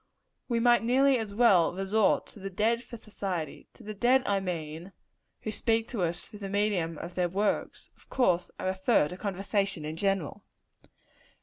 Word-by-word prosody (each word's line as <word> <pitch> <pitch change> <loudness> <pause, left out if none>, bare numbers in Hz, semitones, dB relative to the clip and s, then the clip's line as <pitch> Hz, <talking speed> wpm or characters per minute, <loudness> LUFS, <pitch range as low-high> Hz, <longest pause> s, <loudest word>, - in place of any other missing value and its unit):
We 235 -2 0
might 240 0 +5
nearly 260 +3 +3
as 220 -2 -4
well 200 -8 +4
resort 195 +3 +2
to - - -13
the 195 0 -5
dead 220 +5 +1
for 240 -1 -10
society; 190 -7 -5
to - - -15
the 215 - -6
dead, 250 +5 +3
I 200 -1 +1
mean, 170 -1 -5 0.5
who 215 - -4
speak 225 +1 0
to 230 -6 -3
us 170 -1 -1
through 210 - -12
the 200 -1 -5
medium 195 -5 0
of 170 +3 -7
their 180 -1 0
works. 200 +4 -2
Of - - -24
course 180 -9 +1
I - - -7
refer 190 -2 +2
to 180 - -7
conversation 195 -3 -2
in 155 +1 -5
general. 195 -5 -1
200 Hz, 180 wpm, -29 LUFS, 180-225 Hz, 0.5 s, might